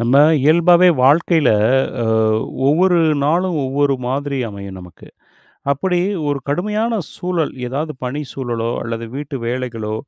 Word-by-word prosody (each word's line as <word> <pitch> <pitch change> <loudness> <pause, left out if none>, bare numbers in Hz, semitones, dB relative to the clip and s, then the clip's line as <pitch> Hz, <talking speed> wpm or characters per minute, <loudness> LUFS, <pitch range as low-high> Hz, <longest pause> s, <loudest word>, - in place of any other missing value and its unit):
நம்ப 120 +3 +2 0.3
இயல்பாவே 170 +4 +5 0.2
வாழ்க்கைல 155 +1 +3 0.5
அ - - -1 0.6
ஒவ்வொரு 175 +5 +3 0.3
நாளும், 175 +4 +1
ஒவ்வொரு 140 +1 +1
மாதிரி 140 +1 -2
அமையும் 100 -2 -9
நமக்கு. 90 -2 -14 0.6
அப்படி 180 +6 -1 0.3
ஒரு 145 -1 -1
கடுமையான 210 +9 -1 0.2
சூழல் 175 -4 -2
ஏதாவது 150 +5 -3
பணி 140 +4 -3
சூழலோ, 120 -3 -3
அல்லது 115 0 -5
வீட்டு 145 -1 -5
வேலைகளோ 115 -3 -3
145 Hz, 120 wpm, -18 LUFS, 120-170 Hz, 0.6 s, இயல்பாவே